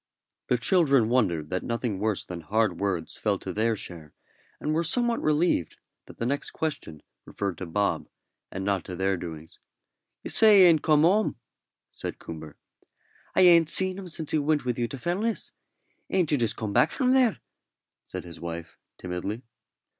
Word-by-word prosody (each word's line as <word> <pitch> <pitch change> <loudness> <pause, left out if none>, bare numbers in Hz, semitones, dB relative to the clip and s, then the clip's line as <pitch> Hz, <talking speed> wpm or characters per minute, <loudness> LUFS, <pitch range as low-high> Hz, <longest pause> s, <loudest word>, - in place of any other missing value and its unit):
The 125 - +2
children 135 - +3
wondered 90 -11 0
that 95 - -1
nothing 115 -4 -3
worse 105 -1 -1
than 90 -2 -7
hard 100 0 0
words 95 -5 -2
fell - - 0
to - - -7
their 110 +1 +1
share, 85 -6 -9 0.4
and 150 - -2
were 165 +2 +1
somewhat 235 +7 +1
relieved 155 - +1 0.3
that - - -13
the 115 - -3
next 140 +3 -2
question 110 - -5 0.2
referred 100 -3 -4
to 95 - -5
Bob, 100 +4 -1 0.4
and 95 0 -5
not 100 -3 0
to 90 - -6
their 95 +2 0
doings. 80 -2 -9 0.6
"You - - -5
say 215 -3 +7
he - - +9
ain't 165 -4 +5
come 150 -1 +3
home?" 200 +6 +3 0.6
said - - -6
Coomber. 80 -2 -9 0.8
"I - - +5
ain't 170 -3 +6
seen 185 +2 +4
him 190 - -8
since 160 -3 -2
he 155 - +2
went 150 -1 0
with 125 -1 -2
you 120 - 0
to 135 - -7
Fellness. 195 - -2 0.6
Ain't 180 -5 +1
you 145 - +3
just 115 -3 0
come 110 -3 -4
from 255 -2 0
there?" 255 -5 +3 0.6
said - - -7
his 85 -2 -10
wife, 85 -1 -7 0.2
timidly. 95 +6 -5
115 Hz, 175 wpm, -26 LUFS, -, 0.8 s, he